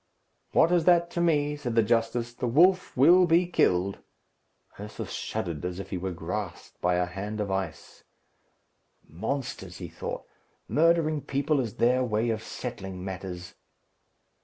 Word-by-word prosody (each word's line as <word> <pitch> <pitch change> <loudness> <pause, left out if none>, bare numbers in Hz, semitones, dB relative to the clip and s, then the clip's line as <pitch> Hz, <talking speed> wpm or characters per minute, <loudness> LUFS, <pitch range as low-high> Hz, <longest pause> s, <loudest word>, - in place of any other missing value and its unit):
"What 165 - +4
is 175 -2 +3
that 170 -1 +4
to 170 - -1
me?" 150 -3 +2
said 125 -6 -4
the 115 - +5
justice. 115 +1 0
"The 125 - -3
wolf 180 +7 +3
will 175 +7 +6
be 170 +2 +4
killed." 95 - +1 0.8
Ursus 105 +1 -7
shuddered, 85 -4 -4
as 90 0 -3
if 95 -1 -8
he 95 - -2
were 95 +1 -3
grasped 90 +2 -6
by 90 0 +2
a 90 0 +1
hand 100 +4 -5
of 100 -2 -2
ice. 95 -4 -5 1.0
"Monsters!" 100 - -4
he 90 -3 -7
thought. - - -6 0.4
"Murdering 155 -1 +2
people 140 +2 0
is 115 -6 -3
their 125 +2 +3
way 115 0 0
of 110 -1 -2
settling 95 -7 -6
matters." 90 -1 -6
115 Hz, 150 wpm, -27 LUFS, 95-150 Hz, 1.0 s, will